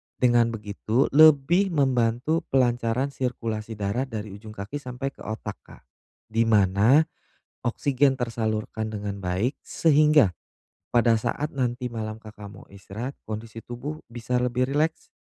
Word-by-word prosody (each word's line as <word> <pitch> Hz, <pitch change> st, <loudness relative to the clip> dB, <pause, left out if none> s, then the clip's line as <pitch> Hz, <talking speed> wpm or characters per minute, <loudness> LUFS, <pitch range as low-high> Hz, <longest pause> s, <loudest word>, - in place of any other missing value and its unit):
dengan 120 Hz, -2 st, +4 dB
begitu 110 Hz, +3 st, -1 dB
lebih 155 Hz, +5 st, +6 dB
membantu 130 Hz, +2 st, +2 dB
pelancaran 125 Hz, 0 st, +1 dB
sirkulasi 115 Hz, -4 st, -3 dB
darah 105 Hz, +6 st, -2 dB
dari 110 Hz, -4 st, -6 dB
ujung 105 Hz, +2 st, -10 dB
kaki 105 Hz, +9 st, -5 dB
sampai 130 Hz, 0 st, -5 dB
ke -, -, -28 dB
otak, 110 Hz, -1 st, -6 dB
Kak. -, -, -17 dB, 0.5 s
Di 115 Hz, +1 st, +2 dB
mana 105 Hz, +7 st, +5 dB, 0.6 s
oksigen 135 Hz, +2 st, +1 dB
tersalurkan 110 Hz, -2 st, -2 dB
dengan 100 Hz, -1 st, -4 dB
baik, 95 Hz, +9 st, 0 dB
sehingga 150 Hz, -, +4 dB, 0.5 s
pada 120 Hz, -1 st, +4 dB
saat 145 Hz, +7 st, -2 dB
nanti 125 Hz, -2 st, -1 dB
malam 110 Hz, -1 st, -4 dB
Kakak 105 Hz, -2 st, -11 dB
mau 105 Hz, -, -13 dB
istirahat, 100 Hz, +7 st, -6 dB
kondisi 110 Hz, +1 st, -7 dB
tubuh 140 Hz, +7 st, -7 dB
bisa 125 Hz, +1 st, -2 dB
lebih 125 Hz, +1 st, +1 dB
rileks, 155 Hz, +2 st, -1 dB
120 Hz, 130 wpm, -25 LUFS, 110-135 Hz, 0.6 s, lebih